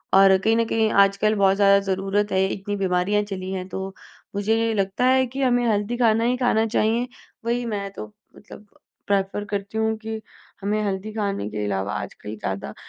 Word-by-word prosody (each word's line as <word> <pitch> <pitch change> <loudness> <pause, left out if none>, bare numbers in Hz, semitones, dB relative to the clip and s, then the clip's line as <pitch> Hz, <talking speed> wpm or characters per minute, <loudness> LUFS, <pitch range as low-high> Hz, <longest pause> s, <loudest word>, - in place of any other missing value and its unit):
और 195 0 +7
कहीं 220 +4 +2
न 230 - +3
कहीं 220 -1 +2
आजकल 200 +2 +1
बहुत 195 -1 +4
ज़्यादा 200 -1 +6
ज़रूरत 195 +2 0
है, 190 0 +3
इतनी 205 +1 -4
बीमारियाँ 190 +2 +1
चली 190 -2 -5
हैं, 185 -1 -4
तो 190 0 -5 0.4
मुझे 205 +2 +1
नहीं 225 0 +1
लगता 195 +4 0
है 260 0 +4
कि 265 +3 -5
हमें 245 -1 +2
हेल्दी 210 +3 -1
खाना 225 -2 +3
ही 245 +1 +2
खाना 245 -3 +2
चाहिए। 225 +3 +1 0.4
वही 240 +1 0
मैं 205 -3 -3
तो 215 - -7 0.3
मतलब 210 0 -14 0.4
प्रेफर 200 +1 0
करती 200 +1 -3
हूँ 220 0 +1
कि 220 0 -6 0.4
हमें 210 +2 0
हेल्दी 200 +2 -3
खाने 200 - -2
के 105 0 -4
अलावा 100 0 -2
आजकल 105 +1 -8
ज़्यादा 95 -8 -4
205 Hz, 185 wpm, -23 LUFS, 195-220 Hz, 0.4 s, और